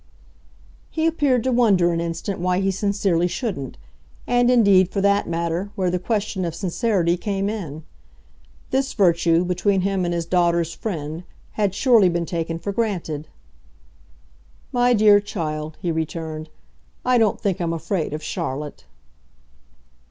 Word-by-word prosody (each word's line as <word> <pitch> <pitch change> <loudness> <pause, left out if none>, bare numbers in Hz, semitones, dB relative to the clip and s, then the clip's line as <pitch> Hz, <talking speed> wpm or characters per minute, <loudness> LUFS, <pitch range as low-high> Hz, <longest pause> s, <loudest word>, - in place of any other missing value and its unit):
He 320 0 -1
appeared 290 -7 +2
to 260 - 0
wonder 200 -8 +3
an 165 - -1
instant 170 +3 -4
why 180 +1 +1
he 195 0 +1
sincerely 195 -3 +1
shouldn't, 180 - -4 0.5
and 245 0 +3
indeed, 200 -7 +5
for 195 - -2
that 200 +1 +2
matter, 170 +3 -2
where 185 -2 0
the 180 - -1
question 205 -1 -2
of 170 -2 -3
sincerity 185 -2 0
came 195 +1 -2
in. 165 -8 -5 0.9
This 265 +1 0
virtue, 170 -3 +3
between 190 +2 +1
him 195 0 0
and 175 - -1
his 170 -1 -2
daughter's 170 -1 +1
friend, 160 -5 -5 0.3
had 200 -3 -1
surely 230 -7 +5
been 170 0 -1
taken 165 -1 -3
for 185 +5 -4
granted. 180 -9 -2 1.4
"My 245 0 +3
dear 210 -2 +6
child," 155 -7 -4
he 175 - 0
returned, 160 -1 -4 0.6
"I 250 -1 +4
don't 220 -3 +2
think 190 -3 -1
I'm 170 -1 0
afraid 165 +1 -2
of 155 +1 -5
Charlotte." 150 - -5
185 Hz, 145 wpm, -22 LUFS, 165-205 Hz, 1.4 s, dear